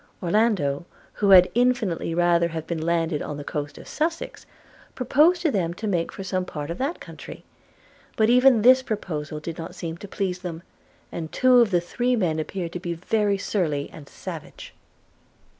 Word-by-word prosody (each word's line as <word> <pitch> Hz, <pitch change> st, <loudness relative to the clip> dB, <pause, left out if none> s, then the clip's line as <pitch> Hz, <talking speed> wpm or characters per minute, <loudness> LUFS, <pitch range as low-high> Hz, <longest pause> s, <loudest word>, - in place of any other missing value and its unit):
Orlando, 175 Hz, -6 st, +1 dB, 0.3 s
who 205 Hz, -, 0 dB
had 185 Hz, -2 st, +8 dB
infinitely 235 Hz, -9 st, +1 dB
rather 170 Hz, -1 st, +3 dB
have 160 Hz, -1 st, -5 dB
been 165 Hz, -2 st, -3 dB
landed 165 Hz, -2 st, 0 dB
on 150 Hz, -, -5 dB
the 145 Hz, -, -6 dB
coast 145 Hz, 0 st, -5 dB
of -, -, -12 dB
Sussex, 330 Hz, +2 st, -3 dB, 0.5 s
proposed 310 Hz, +8 st, +3 dB
to 320 Hz, -, +2 dB
them 175 Hz, -6 st, -1 dB
to 220 Hz, -, -6 dB
make 175 Hz, -5 st, 0 dB
for 195 Hz, -, -7 dB
some 185 Hz, -1 st, -1 dB
part 150 Hz, -3 st, -6 dB
of 170 Hz, -, -6 dB
that 280 Hz, +6 st, -2 dB
country; -, -, -10 dB, 0.7 s
but 220 Hz, -, +4 dB
even 250 Hz, -1 st, +5 dB
this 255 Hz, +2 st, +7 dB
proposal 160 Hz, -10 st, -4 dB
did 165 Hz, +2 st, -7 dB
not 165 Hz, -, -7 dB
seem 165 Hz, -1 st, -5 dB
to 200 Hz, -, -9 dB
please 190 Hz, -2 st, -3 dB
them, 175 Hz, -2 st, -7 dB, 0.5 s
and 160 Hz, -2 st, -5 dB
two 255 Hz, -1 st, +5 dB
of 235 Hz, -3 st, +4 dB
the 175 Hz, -3 st, +2 dB
three 245 Hz, +8 st, 0 dB
men 170 Hz, -8 st, 0 dB
appeared 170 Hz, +2 st, -4 dB
to 180 Hz, -, -5 dB
be 175 Hz, -1 st, -4 dB
very 200 Hz, +3 st, 0 dB
surly 160 Hz, -8 st, -2 dB
and 145 Hz, -3 st, -12 dB
savage. -, -, -9 dB
180 Hz, 180 wpm, -24 LUFS, 165-225 Hz, 0.7 s, had